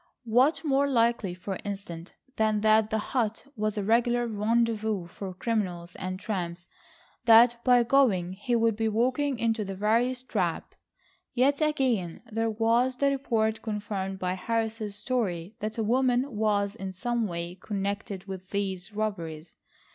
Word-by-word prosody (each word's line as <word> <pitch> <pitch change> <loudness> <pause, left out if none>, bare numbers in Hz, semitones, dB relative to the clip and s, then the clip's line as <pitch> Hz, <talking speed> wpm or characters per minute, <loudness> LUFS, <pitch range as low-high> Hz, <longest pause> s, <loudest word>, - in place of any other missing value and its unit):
What 250 +9 +3
more 280 -2 +2
likely 230 -7 +1
for 190 +1 -5
instance, 195 -4 -6 0.2
than 215 -1 +1
that 215 0 +4
the 220 - 0
hut 220 +1 -2
was 215 -1 -1
a 205 - 0
regular 240 +3 +2
rendezvous 220 -2 0
for 190 +3 -7
criminals 180 -5 -2
and 185 0 -4
tramps, 175 -5 -4 0.6
that 235 +1 +6
by 245 -1 +5
going 230 -9 +3
he 220 +5 -1
would 230 -1 +2
be 225 0 0
walking 255 +5 +1
into 225 -1 0
the 195 -1 -5
veriest 240 +5 +1
trap? 180 -6 -2 0.6
Yet 275 +4 +3
again 255 - 0
there 225 +1 0
was 230 +4 +2
the 280 +2 +2
report 225 -5 0
confirmed 205 -3 -3
by 185 -1 -1
Harris's 220 +1 -2
story 205 -6 -2
that 215 +2 -4
a 225 - 0
woman 250 +2 +1
was 205 -2 +1
in 195 -4 -6
some 235 +3 -1
way 170 -1 -4
connected 200 -1 -3
with 190 -1 -8
these 195 -1 -3
robberies. 170 -7 -4
220 Hz, 145 wpm, -28 LUFS, 195-235 Hz, 0.6 s, that